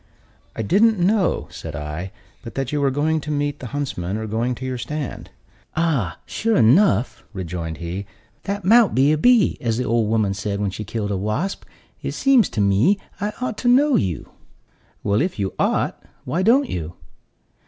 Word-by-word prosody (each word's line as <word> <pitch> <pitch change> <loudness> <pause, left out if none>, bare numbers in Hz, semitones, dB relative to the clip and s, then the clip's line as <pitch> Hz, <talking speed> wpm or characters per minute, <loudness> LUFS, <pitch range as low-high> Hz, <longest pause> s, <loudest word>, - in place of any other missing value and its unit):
"I 110 - -2
didn't 215 - +4
know," 190 +1 +1
said 80 -2 -7
I, 75 +6 -5 0.3
"but 115 - -10
that 135 -1 -2
you 150 -1 0
were 140 - +3
going 155 +3 0
to 150 - -7
meet 145 -1 -1
the 125 - -6
huntsmen, 110 -9 -3
or 110 - -4
going 115 +4 -1
to 130 - -7
your 130 -1 -3
stand." 150 +1 -5 0.5
"Ah, 145 - 0
sure 225 0 0
enough," 120 - +3
rejoined 85 -4 -5
he, 90 +4 -5 0.4
"that 200 -1 -3
mout 230 +2 +5
be 135 +3 +4
a 155 - +2
bee, 245 -1 +4
as 115 -4 0
the 125 - 0
old 115 -3 +1
woman 110 -3 +1
said 100 0 -3
when 100 -1 -1
she 105 - -6
killed 105 0 -3
a 100 - 0
wasp. 110 - -2 0.4
It - - -3
seems 265 - +4
to 105 - -2
me 100 - +3 0.2
I 205 +1 -1
ought 250 -4 -3
to 245 - -2
know 270 +3 +5
you." 90 -5 -1 0.7
"Well, 100 +3 +2
if 180 +3 -1
you 100 -2 -2
ought, - - 0 0.2
why 155 +8 -1
don't 250 +8 +4
you?" 85 0 -5
125 Hz, 185 wpm, -22 LUFS, -, 0.7 s, mout